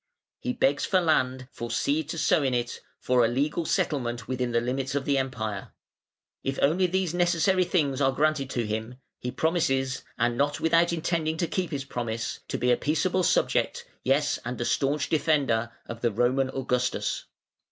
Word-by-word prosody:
He 125 - -2
begs 140 +2 +2
for 190 - +3
land, 130 -7 +1
for 120 - -6
seed 145 +6 0
to 165 - -4
sow 155 - +3
in 130 -3 +1
it, 120 -1 -2 0.2
for 125 -1 +2
a - - +4
legal 145 +7 0
settlement 120 -7 -1
within 125 -1 -1
the 115 - +3
limits 130 +3 -2
of 140 -1 -1
the 140 -1 +2
Empire. 110 -7 -4 0.7
If 135 0 -2
only 180 +6 +3
these 185 -1 0
necessary 175 +1 +3
things 145 -6 +1
are 135 -1 +4
granted 150 -1 +1
to 120 -3 -1
him, 110 +3 -3 0.2
he 125 - -3
promises, 135 -4 0
and 120 0 +1
not 145 +3 0
without 165 +1 +3
intending 160 -1 -1
to 170 - +1
keep 185 0 -2
his 140 -3 -4
promise, 115 -3 -3
to - - -2
be 125 - +2
a 120 - +4
peaceable 170 +5 +1
subject, 175 - +1 0.2
yes 140 +3 +2
and 120 +1 -4
a 120 - -1
staunch 140 +3 +1
defender, 140 -7 +1
of 115 0 -8
the 120 - +2
Roman 125 +4 +1
Augustus. 125 -2 -1
135 Hz, 180 wpm, -27 LUFS, 125-155 Hz, 0.7 s, a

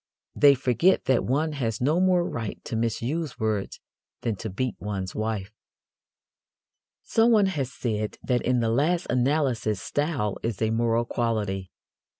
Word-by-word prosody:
They 140 -1 +6
forget 130 - +2
that 130 -2 +3
one 150 +5 +1
has 115 -7 -2
no 150 +7 +2
more 180 -2 +3
right 110 -3 -4
to - - -4
misuse 120 - -2
words 110 -3 -2 0.4
than 115 -3 -1
to 110 - -5
beat 120 +4 -2
one's 95 -3 -4
wife. 110 -2 -3 1.5
Someone 225 -2 +4
has 145 -9 -2
said 110 -3 -3
that 125 -2 +1
in 125 -1 +1
the 115 -1 +1
last 165 +8 +1
analysis 125 -5 +1
style 145 - -1
is 115 -4 -3
a 110 -1 +1
moral 115 +1 +1
quality. 105 -6 -2
120 Hz, 145 wpm, -26 LUFS, 110-145 Hz, 1.5 s, They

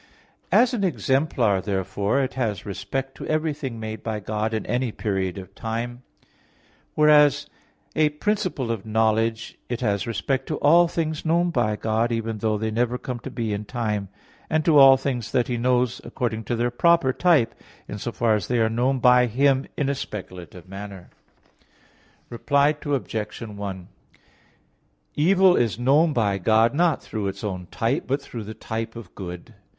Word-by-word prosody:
As 250 +1 +4
an 220 -5 -1
exemplar, 130 - +1
therefore, 100 +5 -1
it 130 - -3
has 110 -7 -2
respect 135 +7 -4
to - - -7
everything 150 -6 -2
made 110 0 -6
by 110 -2 -3
God 105 +1 -2
in 110 -1 -3
any 125 -1 -1
period 95 -4 -2
of 95 0 -9
time; 115 +3 -4 0.9
whereas 150 -2 +5
as - - -25 0.5
a 155 -1 +3
principle 175 - -2
of 110 -4 -4
knowledge 110 +1 0
it 120 - -3
has 100 0 0
respect 130 +4 -2
to 155 - -2
all 170 +4 +5
things 160 -2 -3
known 170 +2 +2
by 115 -7 +1
God, 110 +2 0
even 115 -1 -2
though 110 0 0
they 110 +1 -2
never 120 +2 0
come 125 -1 -5
to - - -7
be 115 -3 -3
in 105 +1 -3
time; 105 -4 -3 0.4
and 155 -1 +1
to 155 -4 +6
all 135 -1 +9
things 130 -4 -3
that 120 -2 +2
He 125 - -1
knows 125 0 +1
according 110 -3 -3
to 120 - -1
their 120 +1 0
proper 165 0 +3
type, 155 -10 +3 0.3
in 105 - -6
so 120 - -4
far 115 -1 +1
as 105 - -1
they 125 - 0
are 110 -1 +2
known 125 +4 +1
by 125 0 +5
Him 135 +3 +2
in 145 - 0
a 140 - +1
speculative 90 - -8
manner. 95 -1 -9 1.2
Reply 140 +5 +2
Obj. 115 -7 -3
1: 100 -4 -6 1.3
Evil 185 +3 +4
is 110 -5 +1
known 145 +7 +3
by 105 -7 0
God 110 +4 +3
not 170 +1 +1
through 105 -3 -4
its 100 +1 -6
own 90 -4 -4
type, 120 +7 -1
but 135 +2 0
through 120 -5 -8
the 110 +1 -8
type 115 +1 -5
of 115 -1 -10
good. 90 -3 -8
115 Hz, 170 wpm, -24 LUFS, 105-140 Hz, 1.3 s, all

